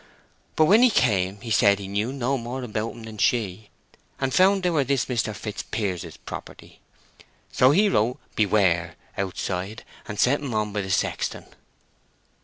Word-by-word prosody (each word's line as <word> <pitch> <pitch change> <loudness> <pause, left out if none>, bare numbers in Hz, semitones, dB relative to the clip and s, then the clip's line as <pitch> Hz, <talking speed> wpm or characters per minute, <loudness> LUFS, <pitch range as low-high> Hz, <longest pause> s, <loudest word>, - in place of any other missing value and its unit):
But 155 - +5
when 210 +9 +6
he 250 - +7
came 100 - +1
he 115 - -6
said 100 -1 +5
he 100 -1 -7
knew 105 +5 -1
no 135 0 -1
more 125 +1 -5
about 110 -1 -3
'em 115 - -11
than 110 -1 -9
she; 110 -5 0 0.5
and 135 -1 -1
found 190 +4 +4
they 180 - +2
were 150 -4 +2
this 135 -1 0
Mr. 115 -4 -1
Fitzpier's 100 -4 -4
property. - - -10 0.7
So 130 - +5
he 195 +9 +4
wrote 120 - +1 0.2
'Beware!' 90 -5 +2 0.2
outside, 95 +2 -4 0.2
and 105 -2 -6
sent 140 +6 +3
'em 130 -6 -3
on 105 -1 -1
by 105 - -1
the 95 - -6
sexton." 95 - -1
110 Hz, 165 wpm, -24 LUFS, 100-135 Hz, 0.7 s, he